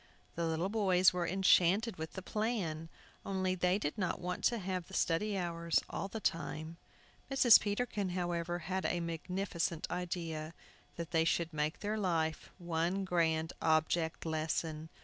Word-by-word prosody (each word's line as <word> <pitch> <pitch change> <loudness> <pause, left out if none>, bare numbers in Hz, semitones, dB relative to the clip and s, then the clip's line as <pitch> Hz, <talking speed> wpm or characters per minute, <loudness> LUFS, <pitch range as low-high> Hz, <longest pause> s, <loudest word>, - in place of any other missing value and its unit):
The 170 0 -1
little 165 +4 0
boys 190 -4 +4
were 175 -1 -1
enchanted 190 +3 +3
with 160 0 -6
the 190 - -6
plan, 190 -8 -2 0.3
only 190 -1 0
they 180 +1 +2
did 180 +1 -3
not 185 -3 -1
want 180 0 -4
to 235 - +3
have 185 -3 -3
the 190 - -9
study 200 +5 +1
hours 170 -2 0
all - - -3
the 220 +3 -5
time. 160 -2 -2 0.5
Mr. 260 -4 +7
Peterkin, 205 -2 -1
however, 175 -1 -1
had 190 +1 -1
a 175 - 0
magnificent 170 0 -2
idea, 165 -3 -4 0.4
that 170 -1 -6
they 165 -1 +3
should 165 0 0
make 150 +1 -1
their 215 +1 -1
life 165 -5 0
one 175 +2 -1
grand 165 -3 +1
Object 160 +1 +1
Lesson. 160 0 -2
175 Hz, 150 wpm, -34 LUFS, 165-190 Hz, 0.5 s, Mr